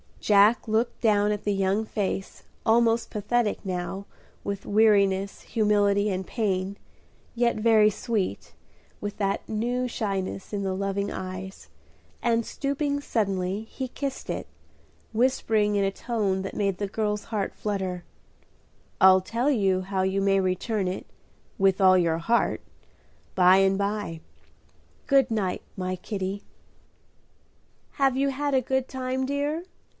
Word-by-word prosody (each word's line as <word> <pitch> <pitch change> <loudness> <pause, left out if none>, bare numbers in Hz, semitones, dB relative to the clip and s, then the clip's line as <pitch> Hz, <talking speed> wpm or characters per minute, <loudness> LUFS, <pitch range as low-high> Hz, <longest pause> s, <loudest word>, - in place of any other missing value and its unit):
Jack 210 +3 +4
looked 220 +2 0
down 210 -2 +3
at 210 -1 -3
the 205 - +1
young 195 +2 +1
face 195 -2 -3 0.2
almost 230 0 +3
pathetic 215 +1 0
now 185 +1 -4 0.4
with 200 -1 -4
weariness, 200 -2 +3
humility, 205 -2 +2
and 190 -1 -2
pain, 195 -3 -1 0.6
yet 235 -1 +2
very 215 -1 +5
sweet, 215 -1 -3 0.5
with 205 0 -5
that 200 -1 -1
new 245 +3 -1
shyness 195 -4 -3
in 200 -1 -1
the 190 -1 -1
loving 200 +1 -2
eyes, 185 +1 -7 0.5
and, 230 -1 +1
stooping 285 0 -2
suddenly, 195 -5 -1
he 260 +4 -6
kissed 275 +1 -5
it, - - -3 0.6
whispering 220 -3 +2
in 200 - +2
a 195 - +1
tone 200 -4 -1
that 195 - -6
made 200 -3 0
the 205 - -2
girl's 210 0 -2
heart 210 -3 -2
flutter, 190 -4 -3 1.0
"I'll 190 -1 +7
tell 230 +8 -1
you 195 -7 +2
how 190 0 -1
you 190 +1 0
may 195 0 +3
return 190 +2 -1
it 185 +1 -4 0.5
'with 195 -1 +3
all 185 -1 +7
your 165 -2 +1
heart,' 235 +8 +1 0.7
by 185 0 +6
and 195 0 +3
by. 200 -5 -2 0.9
Good 275 -3 +4
night, 205 -5 -1
my 185 -1 -2
Kitty." 195 +1 -4 1.5
"Have 270 -2 +2
you 275 +1 +2
had 285 +1 -2
a 260 - +4
good 265 +1 -1
time, 260 0 -2
dear?" 290 +4 -1
205 Hz, 135 wpm, -26 LUFS, 190-230 Hz, 1.5 s, I'll